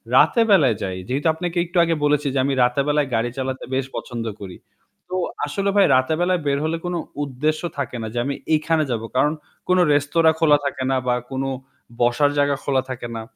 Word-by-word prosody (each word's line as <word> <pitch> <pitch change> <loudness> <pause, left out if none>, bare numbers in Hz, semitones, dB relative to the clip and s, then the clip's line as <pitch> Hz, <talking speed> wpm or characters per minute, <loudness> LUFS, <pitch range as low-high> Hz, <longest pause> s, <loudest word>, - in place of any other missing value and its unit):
রাতে 235 - +5
বেলায় 140 - +5
যাই। 95 -1 -3
যেহেতু 140 +5 -1
আপনাকে 175 +2 -4
একটু 175 +1 -5
আগে 165 -1 +1
বলেছি 145 0 +2
যে 135 - +1
আমি 140 - 0
রাতে 125 +3 +2
বেলায় 150 -1 +2
গাড়ি 115 +2 0
চালাতে 130 0 -3
বেশ 135 0 0
পছন্দ 120 -2 -5 0.2
করি। 95 -3 -8 0.5
তো 185 - -3 0.3
আসলে 195 +7 -1
ভাই 200 -1 +6
রাতে 130 +4 +2
বেলায় 180 0 +1
বের 140 0 +2
হলে 160 +1 -1
কোন 175 0 -2 0.3
উদ্দেশ্য 150 +3 -1 0.2
থাকে 135 -3 -3
না 110 - -4
যে - - -6
আমি 140 0 -2 0.2
এইখানে 155 +1 +2
যাব। 115 -2 -1
কারণ 150 +4 +3 0.3
কোনো 185 0 +4
রেস্তোরাঁ 160 +3 +3
খোলা 150 -3 +5
থাকে 140 -1 -2
না 135 - +2
বা 125 - +3 0.2
কোন 135 0 -2 0.6
বসার 120 +5 +3
জায়গা 145 0 +2
খোলা 135 -2 +1
থাকে 125 -2 -5
না। 115 - -4
145 Hz, 200 wpm, -22 LUFS, 130-160 Hz, 0.6 s, ভাই